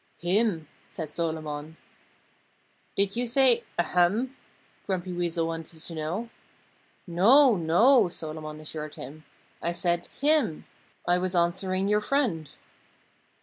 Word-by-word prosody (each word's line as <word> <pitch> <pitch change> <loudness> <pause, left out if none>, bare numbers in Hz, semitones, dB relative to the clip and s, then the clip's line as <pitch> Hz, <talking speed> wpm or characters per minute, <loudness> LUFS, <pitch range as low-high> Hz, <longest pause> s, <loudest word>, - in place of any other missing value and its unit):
"Him!" 180 -3 0 0.2
said 155 -3 -7
Solomon. 155 -1 -4 1.2
"Did 200 +1 +2
you 245 +1 -1
say, 245 -1 +5
'Ahem?'" 180 - +1 0.5
Grumpy 185 -1 -2
Weasel 170 -1 -1
wanted 165 0 -6
to 165 - -6
know. 170 +9 -4 0.7
"No, 230 +9 +5
no!" 180 +8 +4
Solomon 155 -2 -7
assured 155 -1 -7
him. 155 +2 -10 0.4
"I 170 - -1
said, 175 0 -1
'him.' 290 - +2 0.4
I 175 0 +3
was 185 0 -2
answering 185 +2 +1
your 210 +1 +2
friend." 210 - 0
175 Hz, 110 wpm, -27 LUFS, 160-210 Hz, 1.2 s, say